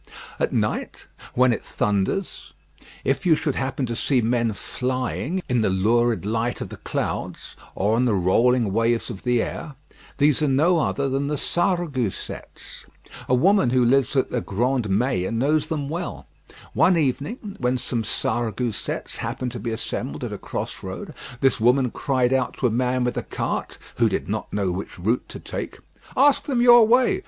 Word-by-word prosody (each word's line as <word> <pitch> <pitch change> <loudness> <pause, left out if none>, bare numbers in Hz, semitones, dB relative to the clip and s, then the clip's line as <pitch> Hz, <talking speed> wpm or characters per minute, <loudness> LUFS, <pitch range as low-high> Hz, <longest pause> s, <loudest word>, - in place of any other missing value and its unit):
At - - +1
night, - - -2 0.3
when 125 0 +4
it - - -4
thunders, 105 - -2 0.5
if - - 0
you 170 -4 +5
should 150 -2 -1
happen 130 0 -2
to 120 -1 -3
see 130 +2 +1
men 115 0 +1
flying 130 - -3
in 125 -3 +1
the 110 - +2
lurid 110 +1 +2
light 115 +3 -1
of - - -5
the - - -9
clouds, - - -4 0.2
or 105 +3 +1
on 125 - +2
the 115 -4 +2
rolling 110 +4 +3
waves 115 +1 +1
of 95 - -8
the 125 -2 +2
air, 150 -4 -6 0.4
these 145 0 +3
are 150 - +2
no 160 +6 +3
other 140 -2 0
than 135 +1 -1
the 150 0 -1
Sarregousets. 170 - -2 0.4
A 130 - +5
woman 190 +1 +4
who 125 0 +3
lives 135 +2 +3
at 130 - +1
the 125 - 0
Grand 120 +2 0
Mielles 105 -1 +1
knows 145 +6 +1
them 150 -3 -2
well. 170 +4 -5 0.5
One 175 +2 +4
evening, 165 - -2
when 125 +1 +1
some 120 -1 -2
Sarregousets 115 0 -2
happened 125 -1 -3
to 120 - -6
be 120 - -3
assembled 75 -9 -4
at - - -4
a - - -6
crossroad, - - -6 0.3
this 135 -3 +3
woman 125 +2 +3
cried 130 -2 +1
out 130 -1 0
to - - -1
a 120 - +3
man 125 +2 +1
with 125 0 -1
a - - 0
cart, - - -4 0.2
who - - +4
did - - -2
not - - -3
know 100 -3 0
which 95 +2 -6
route 110 +8 -1
to - - -7
take, - - -6 0.4
"Ask 280 +2 +4
them 265 -4 0
your 240 -2 +8
way. 245 +2 +4
125 Hz, 175 wpm, -23 LUFS, 115-145 Hz, 0.5 s, your